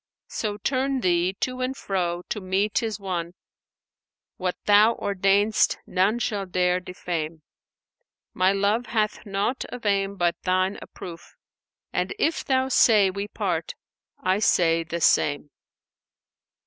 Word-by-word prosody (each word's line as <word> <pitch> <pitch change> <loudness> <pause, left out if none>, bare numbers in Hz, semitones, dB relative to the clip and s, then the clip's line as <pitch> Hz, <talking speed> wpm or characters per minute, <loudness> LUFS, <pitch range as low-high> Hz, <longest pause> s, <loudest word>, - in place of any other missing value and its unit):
So 210 -2 -3
turn 265 +4 0
Thee 175 -1 +2
to 255 0 -2
or 255 +1 -1
fro, 175 -6 -2
to 210 - -3
me 190 +3 0
'tis 220 0 -2
one; 180 -3 -4 0.5
* - - -68
What 180 -1 -1
Thou 210 +3 +6
ordainest 200 +2 +2
none 190 +5 +1
shall 205 -5 -2
dare 180 0 +1
defame: 170 -3 -5 0.9
My 185 +1 +3
love 205 +4 +1
hath 215 -2 -1
naught 200 +6 -1
of 245 -2 -9
aim 200 -1 +1
but 175 -1 +1
Thine 185 +1 0
approof 170 -2 -10 0.3
* - - -58
And - - -1
if 330 -6 0
Thou 260 -1 +1
say 215 -6 +5
we 200 +2 -4
part 180 -7 -3 0.4
I 185 +2 +1
say 165 -5 +3
the 170 +1 -5
same.'" 145 -1 +2
195 Hz, 135 wpm, -25 LUFS, 180-215 Hz, 0.9 s, Thou